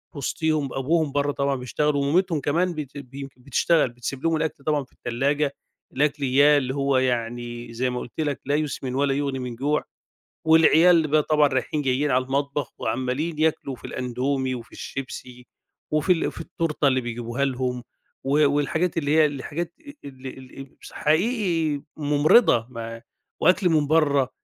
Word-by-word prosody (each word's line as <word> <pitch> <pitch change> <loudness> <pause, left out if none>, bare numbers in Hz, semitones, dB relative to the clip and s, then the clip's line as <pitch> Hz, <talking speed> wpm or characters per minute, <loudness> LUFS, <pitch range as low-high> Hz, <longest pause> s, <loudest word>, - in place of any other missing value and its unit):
وِسطيهم، 150 0 -1
أبوهم 155 +3 +1
برّه 145 +1 +1
طبعًا 140 -1 0
بيشتغل 145 +4 -1
ومامتهم 155 +3 +1
كمان 170 +6 +1
بت 150 -3 -7
ب 135 -2 -10
يمكن 135 -2 -9
بتشتغل، 140 +3 +2
بتسيب 125 +3 -6
لهم 165 0 +2
الأكْل 155 -3 -3
طبعًا 150 -1 0
في 130 - -23
التلّاجة، 140 +4 -1 0.4
الأكل 145 +1 0
إياه 140 +3 +5
اللي 130 -1 -1
هو 140 -1 +1
يعني 120 -1 -2
زي 125 +2 0
ما 125 0 -3
قُلت 125 - -9
لك 145 -3 -1
"لا 140 +2 +1
يُسْمِنُ 140 -4 -2
ولا 140 0 +2
يُغني 140 -1 -2
من 125 -2 -5
جوع" 145 +5 0 0.6
والعيال 160 +1 +6
بقى 155 +1 +3
طبعًا 150 -1 +3
رايحين 135 +3 -1
جايّين 135 +2 +1
على 130 0 +2
المطبخ 140 +1 -2
وعمّالين 130 +6 -2
ياكلوا 155 -3 0
في - - -21
الأندومي 130 +1 -2
وفي 120 -2 -9
الشيبسي 125 -2 -7 0.5
وفي 155 +4 +3
ال 170 - 0
في - - -10
التورتة 150 -3 0
اللي 130 -1 +2
بيجيبوها 120 +2 -3
لهم 125 -2 -2 0.4
و 145 +2 +3
والحاجات، 160 +4 0
اللي 145 -3 -1
هي 155 -1 +6
الحاجات 150 +4 -4 0.3
ال 135 -1 -10
ال 130 +1 -10
مس - - -11
حقيقي 165 - +1
مُمرِضة، 145 - +4
ما 115 -1 -7 0.4
وأكْل 180 +2 +4
من 155 -3 +2
برّه، 145 -4 +3
140 Hz, 160 wpm, -24 LUFS, 130-155 Hz, 0.6 s, والعيال